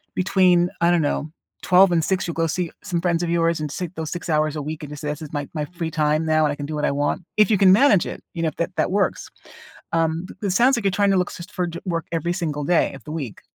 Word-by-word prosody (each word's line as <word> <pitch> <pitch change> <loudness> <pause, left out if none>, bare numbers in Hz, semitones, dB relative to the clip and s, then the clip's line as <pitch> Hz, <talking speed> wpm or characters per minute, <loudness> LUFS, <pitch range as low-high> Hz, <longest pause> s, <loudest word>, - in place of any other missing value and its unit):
between, 180 -2 +3
I 170 - +4
don't 175 -1 +3
know, 145 +1 -1 0.3
12 185 +1 +5
and 165 -2 +2
6, 190 -1 0
you'll 170 - -4
go 165 0 +1
see 175 +1 -2
some 175 -4 -2
friends 175 -1 0
of 170 - -2
yours 165 -1 +1
and 150 -2 -4
sit 180 +2 -5
those 160 -1 -4
6 175 0 -5
hours 155 -1 +1
a 150 - -3
week 155 +2 -6
and 150 - -8
just 150 - -8
say 150 - -4
this 150 +2 -4
is 155 - -10
my 145 -1 -3
my 150 -1 -1
free 170 0 -5
time 155 0 +1
now 155 -1 +3
and 150 - +1
I - - -6
can 145 - -6
do 155 - -4
what 150 - -1
I - - +1
want 145 +5 -1
if 215 -1 +5
you 210 - +4
can 190 -1 +6
manage 210 -4 +5
it, - - -7
you 165 - -3
know, 160 - +2
if - - -14
that 170 - -1
that - - +1
works. 200 +1 0 0.6
Um, 165 +1 0 0.2
it 200 - 0
sounds 245 +6 +4
like 235 - -3
you're 195 - +3
trying 200 0 +2
to - - +3
look 180 - -1
y 170 - -7
for 180 - -1
ju 170 0 -6
work 165 -2 -2
every 170 +1 -1
single 150 -5 -3
day 175 +2 +2
of 135 - -12
the 150 - -7
week. 140 -9 -5
165 Hz, 295 wpm, -22 LUFS, 155-180 Hz, 0.6 s, can